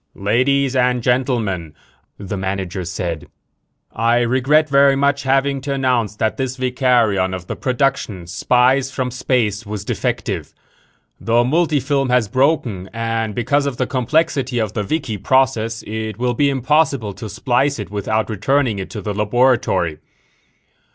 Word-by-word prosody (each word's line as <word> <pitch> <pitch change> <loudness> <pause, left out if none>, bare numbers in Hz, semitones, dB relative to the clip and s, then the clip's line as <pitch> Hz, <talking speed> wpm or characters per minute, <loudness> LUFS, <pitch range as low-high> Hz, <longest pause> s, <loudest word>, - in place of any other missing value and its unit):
"Ladies 130 +6 +1
and 125 -1 +2
gentlemen," 115 - -1 0.4
the 100 0 -5
manager 95 -1 -3
said. 85 -2 -4 0.7
"I 115 +2 +2
regret 130 +6 +3
very 140 -1 +4
much 140 0 +1
having 135 0 +1
to 140 +1 -3
announce 125 -6 0
that 110 +3 -1
this 130 -1 -3
vicarion 120 -7 +1
of 90 -1 -8
the - - -5
production 125 -8 -1
Spies 125 +9 +2
from 130 -1 -3
Space 120 -4 0
was 105 -1 -6
defective. - - -3 0.6
The 115 +1 +2
multifilm 145 -2 +1
has 125 -3 +2
broken 125 - 0
and, 115 -2 -2
because 140 +4 +1
of 130 -4 -3
the 130 - 0
complexity 130 0 0
of 110 -3 -1
the 110 - -1
vikie 110 - -3
process, 115 -4 +1
it 110 -1 -4
will 125 +1 0
be 140 +4 +2
impossible 135 -4 +1
to 110 - -8
splice 125 +6 0
it 105 -3 -7
without 105 +2 -1
returning 115 +1 0
it 95 - -5
to 105 - -6
the 105 +2 -3
laboratory. 105 -6 +1
120 Hz, 145 wpm, -19 LUFS, 105-135 Hz, 0.7 s, very